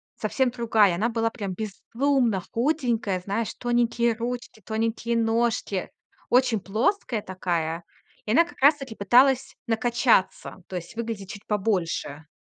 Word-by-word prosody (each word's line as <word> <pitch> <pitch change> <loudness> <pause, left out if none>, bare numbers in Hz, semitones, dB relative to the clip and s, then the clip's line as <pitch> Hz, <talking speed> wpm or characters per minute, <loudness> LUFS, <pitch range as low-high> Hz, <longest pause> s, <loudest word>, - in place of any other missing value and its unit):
совсем 265 -2 0
другая. 220 -6 +3
Она 220 +6 0
была 225 0 0
прям 200 -6 -5
безумно 230 +1 0
худенькая, 235 - 0
знаешь, 200 +4 -3
тоненькие 240 -1 +1
ручки, 240 -1 -5
тоненькие 230 +1 -1
ножки, 225 -4 0 0.4
очень 245 -5 +3
плоская 230 - 0
такая, 170 -3 -2 0.4
и 215 - -2
она 335 +8 +5
как - - -15
раз 290 +3 +7
таки 260 -5 -8
пыталась 255 +6 +3
накачаться, 225 -5 +1
то 185 - -7
есть 175 +6 -8
выглядеть 225 -4 -5
чуть 205 - -10
побольше. 180 -7 -1
225 Hz, 130 wpm, -25 LUFS, 200-240 Hz, 0.4 s, раз